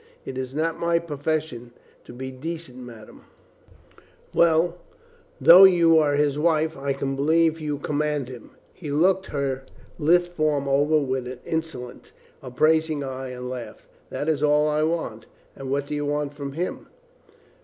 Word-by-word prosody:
"It 130 - -6
is 130 +1 -5
not 165 +1 -1
my 170 0 +2
profession 150 -6 -3 0.3
to - - -11
be 130 +2 -7
decent, 145 -1 -7
madame. 120 -3 -12 1.1
Well 170 +1 +3 0.3
— 475 0 -32
though 180 +3 +11
you 170 -3 +5
are 145 -2 +2
his 145 0 +1
wife, 160 0 +1
I 140 +1 -3
can 135 0 -3
believe 160 +3 +2
you 150 -2 -3
command 150 -1 -2
him" 125 -3 -11
— - - -34
he 155 - -6
looked 185 +6 +2
her 135 -2 -2 0.4
lithe 175 +3 +4
form 155 -5 -1
over 145 +3 +3
with 130 -3 -2
an 125 0 -7
insolent, 160 -7 -5 0.3
appraising 155 +3 +1
eye, 130 -1 -5
and 125 0 -7
laughed 125 -2 -8 0.2
— - - -34
"that 145 - -4
is 155 -3 0
all 150 0 +3
I 150 0 +1
want." 155 -9 -2 0.3
"And 135 -1 -7
what 140 +1 -1
do 145 - -6
you 145 0 -2
want 145 0 -2
of 140 -1 -5
him?" 175 +5 -4
150 Hz, 165 wpm, -24 LUFS, 135-160 Hz, 1.1 s, though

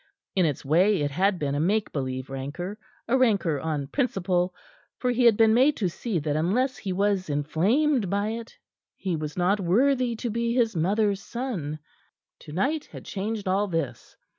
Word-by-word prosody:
In 185 -4 +4
its 145 -3 -3
way 175 +4 +3
it 145 - -1
had 190 +6 +2
been 145 -4 -2
a 145 - 0
make 205 +7 +1
believe 130 -1 -4
rancor, 150 +10 -5 0.3
a 235 - +2
rancor 200 - +2
on 150 -2 -2
principle, 185 - 0 0.5
for 250 - 0
he 245 0 +2
had 225 -3 +6
been 225 -1 +5
made 265 +5 +4
to 190 -5 0
see 195 +3 -3
that 150 -1 -1
unless 225 - +1
he 195 - -4
was 195 -1 0
inflamed 195 - +1
by 200 +2 0
it, 230 +1 -6 0.4
he 185 -3 -2
was 150 0 -5
not 185 +4 +2
worthy 245 +6 +2
to 235 +1 -3
be 235 +1 -1
his 230 -5 +2
mother's 200 +4 +1
son. 190 - -4 0.6
Tonight 270 - -2
had - - -11
changed 210 +1 -4
all 195 +2 +2
this. 165 -7 -4
195 Hz, 175 wpm, -26 LUFS, 160-230 Hz, 0.6 s, had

